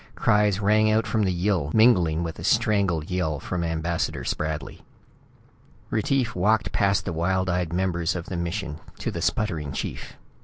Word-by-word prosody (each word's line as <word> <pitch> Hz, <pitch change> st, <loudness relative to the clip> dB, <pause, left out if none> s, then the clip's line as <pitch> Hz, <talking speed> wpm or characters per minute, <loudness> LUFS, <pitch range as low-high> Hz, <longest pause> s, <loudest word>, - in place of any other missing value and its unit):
Cries 105 Hz, -3 st, +2 dB
rang 110 Hz, +1 st, +3 dB
out 110 Hz, +1 st, +2 dB
from 110 Hz, -3 st, +1 dB
the 95 Hz, -, +1 dB
Yill, 90 Hz, -4 st, 0 dB
mingling 90 Hz, -8 st, +4 dB
with 80 Hz, -1 st, -5 dB
a -, -, -7 dB
strangled 95 Hz, -6 st, +1 dB
yell 80 Hz, -5 st, -1 dB
from 90 Hz, +4 st, -3 dB
Ambassador 80 Hz, 0 st, -2 dB
Spradley. 75 Hz, 0 st, -3 dB, 1.1 s
Retief 120 Hz, +2 st, 0 dB
walked 105 Hz, +4 st, +1 dB
past 100 Hz, -1 st, +1 dB
the -, -, -3 dB
wild 95 Hz, +3 st, 0 dB
eyed 90 Hz, -2 st, -1 dB
members 85 Hz, -2 st, 0 dB
of 85 Hz, -2 st, -4 dB
the 95 Hz, -, -5 dB
mission 85 Hz, -2 st, -3 dB, 0.2 s
to -, -, -3 dB
the -, -, -5 dB
sputtering 80 Hz, -10 st, -1 dB
chief. -, -, -5 dB
"Mr. -, -, -23 dB
90 Hz, 165 wpm, -25 LUFS, 85-105 Hz, 1.1 s, mingling